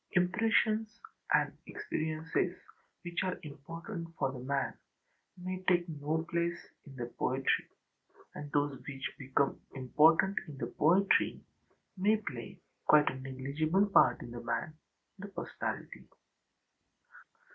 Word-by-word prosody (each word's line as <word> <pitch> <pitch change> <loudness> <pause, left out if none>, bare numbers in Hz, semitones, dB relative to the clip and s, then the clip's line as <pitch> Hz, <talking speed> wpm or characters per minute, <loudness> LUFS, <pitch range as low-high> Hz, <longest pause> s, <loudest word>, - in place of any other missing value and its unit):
Impressions 215 +4 +2 0.3
and - - +3
experiences 160 - -1 0.5
which 175 0 -2
are 185 -1 -1
important 165 +5 -7
for 135 - +1
the 130 - -7
man 140 +2 -1 0.6
may 185 +1 -4
take 175 -1 +4
no 155 +1 -2
place 170 0 0 0.3
in 135 - -11
the 120 -2 -3
poetry, 130 +1 +1 0.7
and 145 -1 -7
those 145 -1 +1
which 135 -1 -5
become 135 +1 +1 0.2
important 160 +8 +4
in 145 -3 -8
the - - -2
poetry 185 +6 +3 0.6
may 205 +3 +3
play 135 - -7 0.3
quite 150 -1 +6
a 130 - -7
negligible 140 +8 +1
part 200 - +5
in 120 - -8
the 120 0 -6
man, 120 +6 -2 0.5
the 205 - -6
personality. 200 - -5
155 Hz, 120 wpm, -33 LUFS, 140-185 Hz, 0.7 s, quite